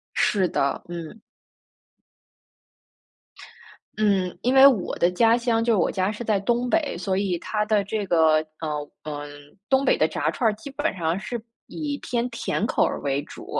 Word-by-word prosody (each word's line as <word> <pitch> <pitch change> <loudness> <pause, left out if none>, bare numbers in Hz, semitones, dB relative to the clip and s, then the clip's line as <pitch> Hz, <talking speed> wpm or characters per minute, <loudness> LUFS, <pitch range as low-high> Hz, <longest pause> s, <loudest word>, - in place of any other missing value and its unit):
是 190 -3 +2
的， 140 -4 -1
嗯。 175 +5 -8 2.8
嗯， 195 -4 +1
因 250 +2 +1
为 270 +1 +8
我 250 -9 +3
的 175 - +3
家 225 +5 +4
乡 235 -2 +1
就 230 -2 +2
我 175 - +1
家 190 +1 0
是 215 +2 -6
在 215 -3 +1
东 240 +5 0
北， 320 -1 0
所 190 -2 -1
以 190 -3 0
它 210 +3 -2
的 210 -2 +2
这 205 +1 -3
个， 160 -4 +4 0.3
呃， 150 -2 -3
嗯， 145 -1 -6 0.4
东 265 0 +3
北 - - +3
的 - - +3
炸 - - -1
串 235 -4 +1
儿 215 - -1
基 220 +6 -10
本 290 -3 -2
上 170 0 -1
是 235 +4 -5 0.3
以 290 -2 -4
偏 240 0 -1
甜 230 -2 -2
口 - - +2
儿 - - -3
为 140 0 -1
主。 - - -11
210 Hz, 185 characters per minute, -24 LUFS, 175-235 Hz, 2.8 s, 为